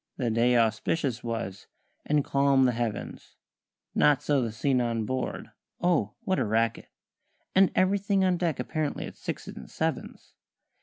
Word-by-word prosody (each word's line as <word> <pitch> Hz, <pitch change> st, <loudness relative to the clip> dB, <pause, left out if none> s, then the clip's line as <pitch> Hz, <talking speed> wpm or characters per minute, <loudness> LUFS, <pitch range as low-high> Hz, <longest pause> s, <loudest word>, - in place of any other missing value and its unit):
The 120 Hz, -3 st, 0 dB
day 120 Hz, +2 st, +3 dB
auspicious 115 Hz, +3 st, 0 dB
was, 115 Hz, -5 st, -4 dB, 0.4 s
and 145 Hz, -1 st, +2 dB
calm 140 Hz, -1 st, +3 dB
the 125 Hz, -, +3 dB
heavens; 120 Hz, -2 st, -4 dB, 0.6 s
Not 145 Hz, -2 st, +3 dB
so 145 Hz, -2 st, +2 dB
the 115 Hz, -2 st, -2 dB
scene 125 Hz, +3 st, +1 dB
on 115 Hz, -2 st, -1 dB
board 130 Hz, +3 st, -4 dB, 0.3 s
oh, 165 Hz, -, +1 dB
what 190 Hz, -1 st, 0 dB
a -, -, +2 dB
racket! 110 Hz, +1 st, 0 dB, 0.6 s
And 190 Hz, 0 st, +5 dB
everything 195 Hz, +1 st, +2 dB
on 180 Hz, -1 st, +2 dB
deck 170 Hz, -6 st, -1 dB
apparently 150 Hz, +4 st, -2 dB
at -, -, -9 dB
sixes -, -, -6 dB
and -, -, -10 dB
sevens. -, -, -4 dB
130 Hz, 150 wpm, -27 LUFS, 115-155 Hz, 0.6 s, And